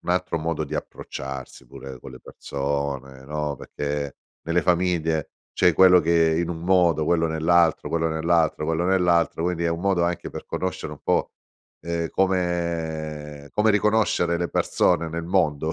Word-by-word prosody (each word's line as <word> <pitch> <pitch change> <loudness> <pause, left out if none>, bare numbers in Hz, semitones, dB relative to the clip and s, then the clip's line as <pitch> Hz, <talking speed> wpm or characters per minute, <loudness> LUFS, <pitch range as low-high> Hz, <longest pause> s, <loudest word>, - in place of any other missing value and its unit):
un - - -4
altro 90 -1 0
modo 80 -1 -2
di 75 +2 -7
approcciarsi 65 -3 -7
pure 65 +1 -10
con 65 - -11
le 65 - -12
persone, 70 -1 -4
no, 75 -1 -3
perché 70 0 -4 0.3
nelle 85 +2 +1
famiglie 85 -3 0 0.2
c'è 90 - +4
quello 90 +1 +7
che 80 -1 +3
in 85 - -3
un 80 - -4
modo, 85 -4 +3
quello 80 -1 +2
nell'altro, 80 +1 +2
quello 80 0 0
nell'altro, 80 -1 +1
quello 80 +2 0
nell'altro. 90 -3 +2
Quindi, 85 -1 -1
è 85 - +2
un 85 +1 -2
modo 95 -3 +1
anche 85 -1 -2
per - - -8
conoscere 95 0 -4
un - - -10
po', - - +1 0.5
ehm, 85 -1 -2
come 80 -5 -2
come 110 +1 +3
riconoscere 105 -5 +2
le 85 0 -2
persone 85 -2 +1
nel 85 +1 -4
mondo, 80 -4 +1
85 Hz, 160 wpm, -24 LUFS, 75-85 Hz, 0.5 s, quello